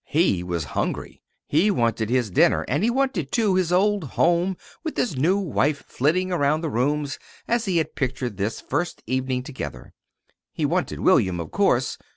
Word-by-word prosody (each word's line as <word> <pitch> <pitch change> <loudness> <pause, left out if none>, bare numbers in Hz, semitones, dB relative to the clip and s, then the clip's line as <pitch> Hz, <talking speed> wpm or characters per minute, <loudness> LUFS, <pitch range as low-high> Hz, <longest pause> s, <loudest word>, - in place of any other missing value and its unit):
He 150 - +2
was 90 -2 -2
hungry. - - -3 0.3
He 165 +8 +3
wanted 115 - 0
his 125 -4 +1
dinner; - - +3
and 145 - 0
he 230 - +3
wanted, 240 - 0
too, 215 -5 +2
his 185 -2 +1
old 200 +1 +2
home 175 +6 +1 0.3
with 320 - -4
his 230 - 0
new 165 +9 +2
wife 150 -6 0
flitting 180 +7 0
about 155 -1 +1
the 160 - -2
rooms 145 +4 -1 0.3
as 235 0 +1
he 185 -4 +1
had 160 - -1
pictured 125 -5 -3
this 105 +3 -2
first 170 +6 -3
evening 130 -1 -1
together. 135 -1 -7 0.6
He - - -1
wanted - - -1
William, 90 -2 +3
of 80 -2 -6
course. - - +1
150 Hz, 175 wpm, -24 LUFS, 125-185 Hz, 0.6 s, He